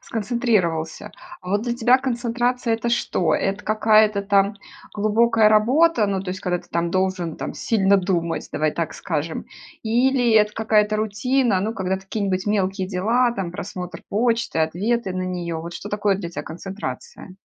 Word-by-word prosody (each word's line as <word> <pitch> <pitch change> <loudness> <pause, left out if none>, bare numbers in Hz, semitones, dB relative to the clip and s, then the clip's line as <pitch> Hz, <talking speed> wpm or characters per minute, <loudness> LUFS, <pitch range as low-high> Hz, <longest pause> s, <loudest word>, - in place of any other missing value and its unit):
сконцентрировался. 210 -6 -1 0.3
А - - -10
вот 205 +2 +1
для 240 -1 -2
тебя 245 +2 +4
концентрация- 245 -1 -1
это 235 +1 -2
что? 185 -7 +1
Это 195 +2 -2
какая-то 215 -1 +3
там 200 0 +2 0.4
глубокая 220 +1 +3
работа, 235 +3 +4
ну 195 -1 -1
то 195 - -8
есть 185 - -3
когда 180 -1 -1
ты - - -17
там 170 0 -1
должен 185 -3 -1
там - - -5
сильно 200 -3 +2
думать, 175 -3 -1
давай 155 0 +1
так 165 -1 -3
скажем. 160 -1 -3 0.4
Или 245 +2 +2
это 210 -1 +4
какая-то 215 -1 +2
рутина, 220 +1 +1
ну, 220 +4 -2
когда 190 0 -1
какие-нибудь 195 -1 -3
мелкие 195 -2 0
дела, 225 +7 +1
там, 195 -6 -4
просмотр 180 -1 -7
почты, 230 -4 0
ответы 190 +6 0
на 185 - -3
нее. 175 -2 -3
Вот 170 +1 -8
что 205 - -7
такое 205 -1 +1
для 185 -3 -5
тя - - -5
концентрация? 190 +1 -7
205 Hz, 160 wpm, -22 LUFS, 185-230 Hz, 0.4 s, тебя